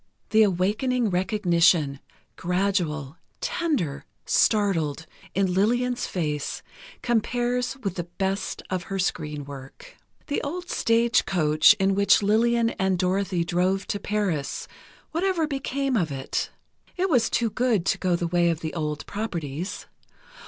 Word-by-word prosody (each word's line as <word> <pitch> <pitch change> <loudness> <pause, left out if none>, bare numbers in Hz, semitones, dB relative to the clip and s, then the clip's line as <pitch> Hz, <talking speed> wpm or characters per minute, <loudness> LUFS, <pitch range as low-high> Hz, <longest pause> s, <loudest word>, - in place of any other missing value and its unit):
The 220 - +5
awakening 210 +5 +1
recognition, 175 -6 +2 0.4
gradual, 175 -5 -1 0.2
tender, 250 - -1 0.2
startled, 165 -8 +2 0.3
in 190 -1 +1
Lillian's 245 +6 +1
face, 150 -5 -3 0.4
compares 245 +2 0
with 195 -3 -3
the 175 - -2
best 190 +3 -3
of 185 -1 -2
her 195 - -2
screen 150 -6 -2
work. 140 - -11 0.3
The 290 - -1
old 350 +5 -5
stage 230 +1 +2
coach 155 0 +5
in 195 -1 +2
which 200 +1 +4
Lillian 230 +3 +3
and 190 -1 +2
Dorothy 185 0 0
drove 185 +3 0
to 205 - -1
Paris... 200 -10 -2 0.4
whatever 345 0 +1
became 275 -2 -2
of 170 -9 +1
it? 135 -1 -2 0.5
It 370 +1 +1
was 250 -10 +3
too 230 -2 0
good 235 -7 +1
to - - +1
go 180 -2 +1
the 170 - -2
way 175 0 +2
of 165 -1 -2
old 150 -3 -3
properties. 175 -6 -4
195 Hz, 130 wpm, -25 LUFS, 170-230 Hz, 0.5 s, The